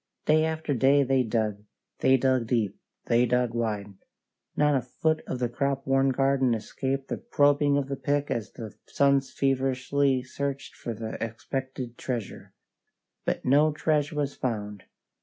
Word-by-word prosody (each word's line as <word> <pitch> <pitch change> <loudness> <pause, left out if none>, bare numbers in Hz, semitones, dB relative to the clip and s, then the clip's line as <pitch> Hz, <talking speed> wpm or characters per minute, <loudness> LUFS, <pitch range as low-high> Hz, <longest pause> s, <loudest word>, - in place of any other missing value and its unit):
Day 155 +1 +4
after 160 -2 -2
day 140 +3 +4
they 135 0 +2
dug; 110 -3 -1 0.4
they 130 0 +5
dug 130 -2 +1
deep; 115 -5 0 0.3
they 120 +1 +3
dug 125 -1 +1
wide. 105 -4 -2 0.6
Not 150 0 +3
a 130 - +2
foot 155 +6 -1
of - - -3
the 125 -1 0
crop 135 +3 -2
worn 135 0 +3
garden 135 -2 +2
escaped 135 +5 -3
the - - -3
probing 145 0 +3
of 140 -2 -1
the 140 - -3
pick 145 +1 -1
as 115 -3 -2
the 110 -4 -8
sons 140 -1 +2
feverishly 135 0 +1
searched 135 +1 -4
for 115 - -5
the 110 +1 -5
expected 125 +2 -5
treasure. 120 -6 -5 0.7
But - - -2
no 145 +4 +4
treasure 150 0 0
was 145 -1 -1
found. 105 -5 -4
130 Hz, 155 wpm, -27 LUFS, 120-140 Hz, 0.7 s, they